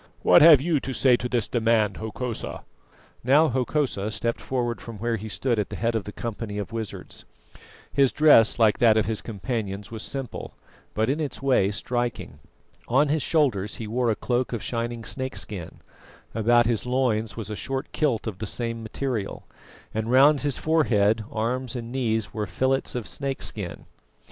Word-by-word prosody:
What - - +7
have 155 -4 +9
you 160 -1 +1
to 135 - -5
say 130 -1 +4
to 125 - -4
this 120 -3 0
demand, 110 -4 +1
Hokosa?" 110 +2 -5 0.6
Now 145 +6 +5
Hokosa 130 -4 -1
stepped 115 +2 -2
forward 120 -3 -2
from 115 -2 -8
where 115 +2 -1
he 110 0 -6
stood 120 +1 0
at 105 - -1
the - - -6
head 115 +1 0
of 110 -3 -2
the 105 - -6
company 110 -2 -5
of 105 +2 -4
wizards. 115 -2 -6 0.7
His 135 -2 +4
dress, 145 -8 +5
like 110 -3 +3
that 115 -2 +5
of 110 - +2
his 110 -1 -2
companions, 105 -1 -4
was 110 -1 -6
simple, 135 -1 -5 0.4
but 110 +1 +1
in 140 +4 0
its 145 -3 -4
way 125 -8 +3
striking. 120 - -3 0.5
On 140 +5 +3
his 155 +1 +1
shoulders 125 - +1
he 115 - -6
wore 120 +3 0
a 110 - +2
cloak 125 +2 -1
of 115 - -3
shining 115 -1 -3
snakeskin; 110 -7 -5 0.5
about 120 +2 +4
his 115 0 0
loins 115 -5 0
was 110 -2 -5
a - - -3
short 135 +6 -4
kilt 135 -8 0
of 105 -5 -5
the 110 - -4
same 115 +2 -2
material; 115 -2 -4 0.5
and 110 +1 -2
round 140 +3 +5
his 145 -2 0
forehead, 110 -9 +2
arms 120 +3 -2
and 120 -1 -5
knees 115 -4 -1
were 105 -2 -3
fillets 130 +11 0
of 120 -3 -3
snakeskin. 130 -9 -4
115 Hz, 175 wpm, -25 LUFS, 110-130 Hz, 0.7 s, have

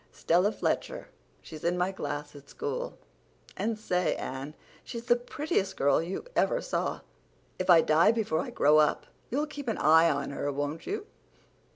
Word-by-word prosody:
"Stella 180 +5 +2
Fletcher; - - -2 0.3
she's 155 -2 -10
in 175 +1 +1
my 180 +2 +1
class 145 -5 -5
at 140 -1 -13
school. 475 +3 -4 0.6
And 220 +3 -1
say, 180 -4 0
Anne, 135 +4 -6 0.3
she's 235 0 -7
the 240 - +5
prettiest 245 - -2
girl 140 +3 +3
you 175 - -5
ever - - +2
saw. - - -2 0.6
If 185 - -3
I 170 -2 +8
die 160 +5 +4
before 215 -9 0
I - - -3
grow 150 +1 +4
up 150 - +2 0.2
you'll 290 +5 0
keep 290 -3 -8
an 225 - -1
eye 160 +2 +6
on 145 -2 -1
her, 145 +1 -2
won't 145 +3 -4
you?" 415 +1 -3
180 Hz, 170 wpm, -29 LUFS, 150-235 Hz, 0.6 s, I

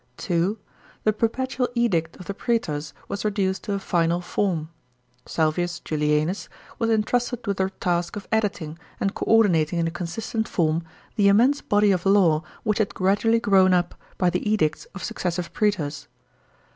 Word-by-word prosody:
(2) 175 +5 0 0.5
The 215 - +3
Perpetual 250 +3 -1
Edict 175 -9 +1
of 180 - -10
the 200 - -4
praetors 170 -10 -1 0.2
was 200 - -4
reduced 195 -3 0
to 205 - -2
a - - 0
final 170 -3 +1
form. 175 -3 -1 0.6
Salvius 170 +2 0
Julianus 150 +4 0 0.3
was 230 -1 +1
entrusted 240 +2 0
with 200 -2 -1
the 190 0 0
frisk 175 -1 0
of 205 - -7
editing, 190 -8 -1 0.2
and 195 - 0
co - - -4
ordinating 180 -7 +4
in 165 -1 +1
a - - -2
consistent 205 +6 -3
form, 160 -2 +1 0.4
the 205 -2 +4
immense 245 +8 +4
body 205 0 +3
of 180 -2 0
law 180 -6 +4 0.2
which 215 -1 0
had 215 - 0
gradually 205 +5 +2
grown 190 -4 +4
up. 175 0 0 0.2
by 180 -1 +2
the - - -1
edicts 155 -8 +1
of 195 - -7
successive 175 -1 -3
prsetors. 150 -9 -1
190 Hz, 160 wpm, -24 LUFS, 170-215 Hz, 0.6 s, ordinating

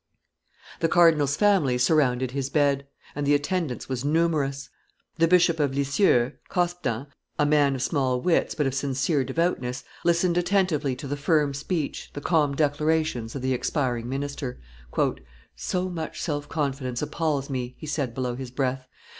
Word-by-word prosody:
The 165 - +2
cardinal's 160 -5 +4
family 185 -12 +3
surrounded 125 -2 +2
his 135 0 -2
bed; 140 -1 +1 0.3
and 145 - -3
the 145 - +5
attendance 145 -2 -2
was 130 -1 -3
numerous. 145 -3 0 0.5
The 165 - +5
Bishop 170 -1 +4
of 140 -2 +1
Lisieux, 140 - +3 0.2
Cospdan, 175 -9 -1 0.3
a 145 - +3
man 145 -2 +3
of 130 - -3
small 130 -5 +1
wits, 170 +5 +1
but 150 - 0
of 135 - 0
sincere 135 +1 0
devoutness, 130 -3 -1 0.2
listened 170 +1 +2
attentively 175 -7 +1
to 140 - -7
the 145 - -2
firm 145 0 +2
speech, 150 +2 -3
the - - -5
calm 150 -3 +2
declarations, 150 -4 0
of 135 - -5
the 130 0 +1
expiring 125 -3 -1
minister. 135 -1 -4 1.0
"So 185 0 -2
much 165 -3 -5
self 145 -3 -3
confidence 135 -4 -2
appalls 150 -2 -1
me," 125 -1 -3
he - - -9
said 145 -5 -2
below 125 -2 -2
his 130 0 -6
breath. 130 0 -2
145 Hz, 155 wpm, -25 LUFS, 130-160 Hz, 1.0 s, the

